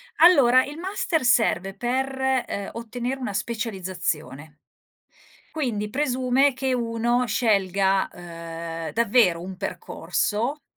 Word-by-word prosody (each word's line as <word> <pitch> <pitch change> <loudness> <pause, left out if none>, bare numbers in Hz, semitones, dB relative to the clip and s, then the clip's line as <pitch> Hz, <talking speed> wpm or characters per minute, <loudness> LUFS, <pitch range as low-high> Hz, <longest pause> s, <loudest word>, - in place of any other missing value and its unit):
Allora, 265 -7 +6
il 290 +2 -8
master 365 -4 -1
serve 195 -6 +2
per, 255 +5 -1 0.4
ehm, 200 -1 -4
ottenere 240 +3 -4
una 235 -6 -4
specializzazione. 180 - -4 0.9
Quindi 225 -9 -2
presume 260 +1 +2
che 260 0 -1
uno 240 +1 0
scelga, 195 -4 +2
ehm, 165 -1 -7
davvero 220 -6 +3
un 185 +2 -7
percorso, 255 - -2
230 Hz, 100 wpm, -24 LUFS, 190-255 Hz, 0.9 s, Allora